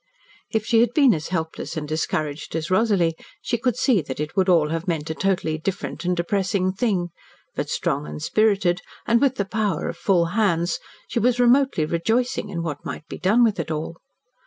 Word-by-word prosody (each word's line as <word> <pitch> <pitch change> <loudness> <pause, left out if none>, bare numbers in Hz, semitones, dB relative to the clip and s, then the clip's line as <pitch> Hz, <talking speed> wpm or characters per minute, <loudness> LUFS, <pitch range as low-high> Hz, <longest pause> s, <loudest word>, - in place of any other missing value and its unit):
If 220 -2 -1
she 230 - +3
had 235 +1 +2
been 275 -6 +6
as 155 -3 -3
helpless 165 -1 -4
and 150 -1 -3
discouraged 155 -1 -2
as 160 +1 -3
Rosalie 185 -5 +2 0.2
she 235 - -2
could 250 -1 0
see 250 -7 +3
that 140 -2 -7
it 150 0 -4
would 190 -1 +2
all 165 -4 +4
have 165 +3 -3
meant 160 -2 -1
a - - -1
totally 175 -3 0
different 185 -1 -4
and 180 0 +1
depressing 185 +1 0
thing, 190 -5 0 0.4
but, - - -3
strong 75 - -1
and 75 0 -6
spirited, 200 - +2 0.2
and 235 0 +3
with 270 -2 +3
the 200 - -1
power 200 -5 -1
of - - -6
full 180 -4 +2
hands, 175 -6 +1 0.3
she - - -1
was 245 +2 +2
remotely 245 - +4
rejoicing 220 +8 0
in 170 -4 -3
what 150 -4 -4
might 150 - -7
be - - -8
done 215 +6 +4
with 215 -5 +2
it 165 - -3
all. 160 +1 -4
185 Hz, 200 wpm, -23 LUFS, 160-220 Hz, 0.4 s, been